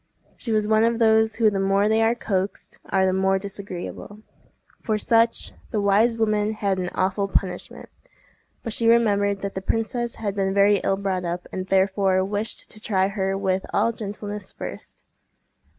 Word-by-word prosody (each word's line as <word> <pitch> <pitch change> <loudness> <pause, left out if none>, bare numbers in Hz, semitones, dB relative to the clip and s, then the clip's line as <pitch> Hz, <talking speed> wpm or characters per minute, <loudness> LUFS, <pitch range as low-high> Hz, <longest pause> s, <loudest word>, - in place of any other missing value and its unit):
She 230 - -6
was 215 -1 +1
one 220 0 +4
of 230 0 +2
those 220 -1 +3
who 220 -2 +3
the 195 - -1
more 195 +1 +2
they 220 +1 +2
are 225 +1 +3
coaxed 195 -4 -3
are 190 -1 +2
the 185 - +2
more 190 0 +2
disagreeable. 200 +1 -7 0.6
For 215 -3 0
such, 230 +2 +1 0.2
the 215 - -1
wise 210 +4 +3
woman 215 -1 +1
had 200 -3 -1
an 180 -1 -2
awful 195 +2 0
punishment, 190 -2 -3 0.8
but 230 - -3
she 230 - 0
remembered 205 -4 +3
that 200 - -3
the 190 - -4
princess 230 +3 -2
had 205 -3 -3
been 195 -1 0
very 200 +1 +5
ill 195 0 0
brought 190 -2 -2
up, 175 +1 -4
and 185 0 -4
therefore 190 -1 +2
wished 205 +2 -4
to 215 - -11
try 195 -3 +1
her 195 -1 -1
with 190 -1 0
all 220 +3 +3
gentleness 205 -2 -6
first. - - -9
200 Hz, 175 wpm, -23 LUFS, 195-220 Hz, 0.8 s, very